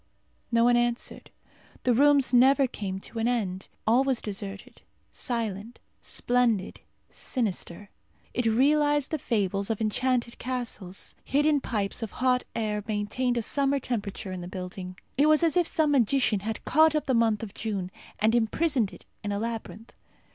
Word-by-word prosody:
No 230 0 +4
one 240 0 +5
answered. 240 0 -2 0.5
The 250 - +3
rooms 275 0 +4
never 270 +3 +6
came 200 -6 -4
to 230 - -6
an 225 - +1
end. 195 -6 -1 0.2
All 235 +4 +4
was 265 -3 +1
deserted, 200 -1 -6 0.3
silent, 225 -2 -3 0.2
splendid, 240 -5 0 0.3
sinister. 205 -5 -3 0.4
It 245 -1 0
realized 290 +4 +3
the 315 - -1
fables 200 -4 -1
of 225 - -1
enchanted 235 +2 0
castles. 235 -7 -4
Hidden 295 +1 +2
pipes 205 -4 -2
of 225 - -5
hot 250 0 +1
air 210 -2 -1
maintained 230 +4 -1
a 235 - 0
summer 280 +3 +1
temperature 205 -6 -4
in 185 -1 -5
the 175 - -6
building. 185 0 -7 0.2
It 295 - +5
was 310 +2 +4
as 330 0 +2
if 350 -2 +3
some 315 -4 +2
magician 250 -4 +2
had 220 +2 -5
caught 315 +1 +4
up 305 - 0
the 265 - +1
month 225 -2 +2
of 205 -3 -7
June 200 -6 -3 0.3
and 220 +2 +2
imprisoned 240 - +1
it - - -14 0.2
in 205 - -2
a 200 - -1
labyrinth. 225 0 -5
235 Hz, 160 wpm, -27 LUFS, 205-260 Hz, 0.5 s, never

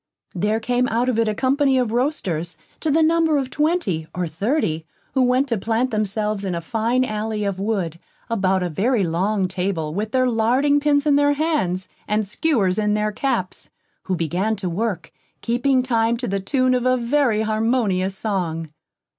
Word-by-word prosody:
There 210 +4 0
came 245 +2 0
out 240 +3 +1
of 235 -3 0
it 230 - +2
a 215 - 0
company 270 +2 +2
of 245 -4 +1
roasters, 200 - -1 0.2
to 320 - -1
the 320 +2 +4
number 325 -1 +3
of 265 -2 -2
twenty, 295 - 0
or 180 0 -1
thirty, 165 - -1 0.3
who 265 - +2
went 255 +2 +3
to 230 -4 0
plant 230 +5 0
themselves 210 -1 -1
in 185 -3 -2
a - - -1
fine 230 +7 0
alley 215 -1 -3
of 200 -2 -2
wood, 195 -6 -2 0.3
about 190 -4 +1
a 180 - -1
very 210 - +1
long 185 +4 0
table, 180 -4 -2
with 215 +4 -3
their 255 0 +2
larding 250 +5 +2
pins 290 0 +2
in 290 -2 +4
their 290 0 +4
hands, 285 - -1 0.2
and 210 0 +1
skewers 210 -6 +1
in 210 0 +1
their 210 0 0
caps, 230 -5 -2 0.4
who 190 - 0
began 180 +6 -1
to 195 -3 -4
work, 195 -1 -3 0.3
keeping 255 +2 +1
time, 230 -2 +1
to 245 - -4
the 195 0 -1
tune 255 +6 +1
of 250 0 +1
a 255 0 +3
very 240 -3 +1
harmonious 215 -4 0
song. 165 -7 -2
220 Hz, 180 wpm, -22 LUFS, 190-255 Hz, 0.4 s, the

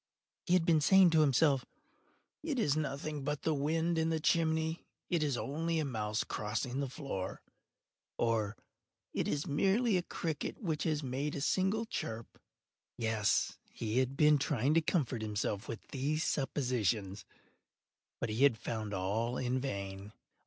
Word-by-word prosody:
He 175 - +3
had 175 -3 +3
been 160 -3 +4
saying 190 +2 +6
to 160 -1 +5
himself—“It 150 - -1
is 150 - +2
nothing 150 -1 -3
but 150 +1 -2
the 160 - +2
wind 160 +3 +1
in 160 0 +1
the 160 -1 0
chimney—it 160 +1 0
is 145 -5 0
only 165 +6 -1
a 155 - +1
mouse 110 -5 -1
crossing 120 +5 -3
the 140 -2 -1
floor,” 130 -9 -5 0.7
or 115 -2 0 0.6
“It - - -1
is 145 0 -1
merely 195 - +2
a - - +1
cricket 160 -3 -4
which 160 -8 -2
has 155 -2 0
made 135 +3 -2
a - - -2
single 190 +8 +1
chirp.” 115 - -5 0.6
Yes, 110 -3 +1
he 115 +2 -1
had 130 +1 0
been 150 -1 +5
trying 135 0 +1
to 165 - +4
comfort 135 -8 0
himself 105 -1 -2
with 115 -3 -7
these 145 +4 -1
suppositions: 115 -8 0 1.0
but - - -2
he 110 +4 -2
had 140 -5 +5
found 110 -2 -4
all 110 +6 -1
in 130 +1 0
vain. 100 -5 -5
140 Hz, 150 wpm, -33 LUFS, 115-160 Hz, 1.0 s, saying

